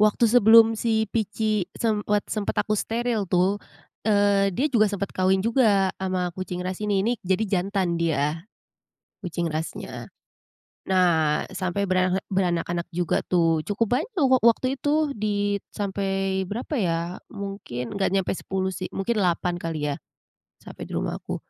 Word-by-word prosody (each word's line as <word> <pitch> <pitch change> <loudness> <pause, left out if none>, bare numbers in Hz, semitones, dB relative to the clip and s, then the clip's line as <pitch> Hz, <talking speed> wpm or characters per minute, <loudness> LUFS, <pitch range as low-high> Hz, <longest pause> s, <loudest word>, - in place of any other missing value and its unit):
waktu 215 +2 +4
sebelum 225 -1 +7
si 220 -1 +1
Pici 215 -2 0
semwat 210 -2 0
sempet 210 -2 -2
aku 215 - -2
steril 230 -2 -1
tuh, 185 +3 +2 0.5
eee, 200 -1 +3
dia 280 - +2
juga 215 -2 +5
sempat 200 -1 -3
kawin 190 +1 +2
juga 215 -6 +3
ama 185 -1 -1
kucing 180 0 -5
ras 185 0 -3
ini, 205 -2 +1
ini 235 - +2
jadi 190 +4 0 0.2
jantan 185 -3 -1
dia 160 +2 0 0.7
kucing 175 -2 -3
rasnya. 155 +1 -5 0.8
Nah, 165 -5 +3
sampai 190 +2 -1
berarek 185 0 +1
beranak-anak 175 -2 0
juga 175 0 0
tuh, 165 -3 +2
cukup 215 - 0
banyak 430 - -5 0.2
wak 260 -1 +4
waktu 235 +3 +3
itu 300 0 +1
dit 205 -2 -1
sampai 195 -1 -2
berapa 240 +8 -4
ya, 170 -5 +1 0.3
mungkin 195 - -6
nggak 200 -1 0
nyampe 195 0 0
10 190 0 -3
sih, 185 - -4
mungkin 210 +3 -1
8 175 0 0
kali 155 -3 -2
ya, - - -4 0.7
sampai - - -9
di - - -10
rumahku. - - -3
195 Hz, 145 wpm, -25 LUFS, 180-215 Hz, 0.8 s, sebelum